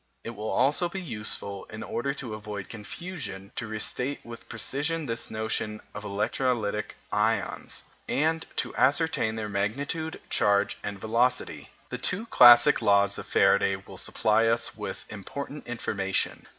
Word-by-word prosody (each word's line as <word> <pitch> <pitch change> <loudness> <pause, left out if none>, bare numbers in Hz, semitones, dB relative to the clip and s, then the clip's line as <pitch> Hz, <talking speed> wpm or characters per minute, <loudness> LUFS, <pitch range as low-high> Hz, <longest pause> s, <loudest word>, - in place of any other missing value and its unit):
It 115 - -5
will 110 -1 -5
also 145 +8 +2
be 190 - -4
useful, 105 - -4
in 110 0 -8
order 140 +4 -2
to 125 -6 -5
avoid 105 -3 -6
confusion, 105 - -7
to 115 - -3
restate 125 +5 -2
with 115 0 -10
precision 145 +7 -1
this 115 -3 -3
notion 110 0 -2
of 105 - -6
electrolytic 105 +1 -1 0.2
ions, - - 0 0.3
and 160 +3 +1
to - - -2
ascertain 140 -5 +2
their 110 -1 -3
magnitude, 140 +11 -2
charge, 100 0 +2
and 100 -1 -4
velocity. 120 +4 0 0.2
The - - -4
two 200 +5 0
classic 120 - +8
laws 100 -2 +3
of - - -8
Faraday - - +4
will - - -11
supply 110 +1 +2
us 115 0 +1
with 105 -3 -6
important 140 +8 -7
information. 100 -5 -2
115 Hz, 140 wpm, -28 LUFS, 105-140 Hz, 0.3 s, classic